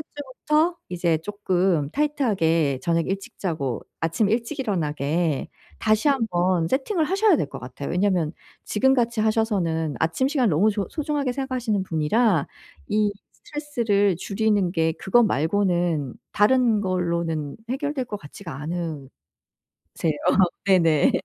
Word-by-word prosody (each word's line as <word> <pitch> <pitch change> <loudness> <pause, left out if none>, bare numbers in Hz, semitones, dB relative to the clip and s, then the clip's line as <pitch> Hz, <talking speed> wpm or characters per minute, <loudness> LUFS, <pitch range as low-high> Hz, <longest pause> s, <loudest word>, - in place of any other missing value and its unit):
주부터 300 +5 0
이제 170 -2 +1
조금 185 -4 0
타이트하게 170 - +1
저녁 165 -1 +1
일찍 195 +1 -5
자고 150 - -2 0.2
아침 165 +6 +1
일찍 235 +6 -1
일어나게 160 - -1 0.3
다시 215 +5 +2
한번 185 -10 +1
세팅을 310 - 0
하셔야 390 +2 +3
될 145 - -2
것 - - -7
같아요. 130 +3 -7
왜냐하면 180 -3 +1 0.3
지금 265 +5 +2
같이 235 -3 0
하셔서는 195 -9 0
아침 165 +11 +1
시간을 265 - +1
너무 185 +8 +3
조 205 -2 -2
소중하게 295 -4 -1
생각하시는 250 -6 -1
분이라 170 - +2 0.4
이 210 -1 +1 0.2
스트레스를 230 - 0
줄이는 200 -2 0
게 160 -2 +1
그것 235 +8 +3
말고는 175 - +1 0.2
다른 225 0 +3
걸로는 170 -5 -2
해결될 275 0 -2
것 210 - -5
같지가 160 -1 -10
않으세요. 160 -4 -4 1.6
네네. 165 -6 +4
195 Hz, 300 characters per minute, -24 LUFS, 165-240 Hz, 1.6 s, 네네